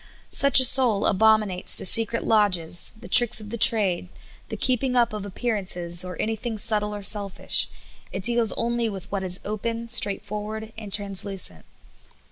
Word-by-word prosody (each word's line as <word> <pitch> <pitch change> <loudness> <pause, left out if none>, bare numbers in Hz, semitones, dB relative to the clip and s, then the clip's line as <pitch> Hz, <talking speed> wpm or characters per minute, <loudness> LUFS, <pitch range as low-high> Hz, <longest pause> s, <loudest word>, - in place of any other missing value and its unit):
Such 280 -1 +6
a 260 - +5
soul 245 -5 +2
abominates 215 -2 0
the - - -5
secret 230 +4 +2
lodges, 185 -6 0
the - - -13
tricks 240 -2 +8
of 215 +1 -8
trade, 195 -6 +3 0.4
the - - -7
keeping 255 0 -2
up 240 -2 0
of 205 -1 -8
appearances, 185 -5 -2
or 180 0 -10
anything 225 +1 -5
subtle 210 -1 -2
or 205 - -10
selfish; 200 -1 +2 0.4
it 190 - -8
deals 235 0 +2
only 235 -1 -3
with 195 -2 -11
what 200 -1 -4
is 180 0 0
open, 230 +2 -6
straightfor 210 -2 0
ward, 220 +1 -9
and 215 -2 -11
translucent. 195 - -3
210 Hz, 155 wpm, -22 LUFS, 195-230 Hz, 0.4 s, tricks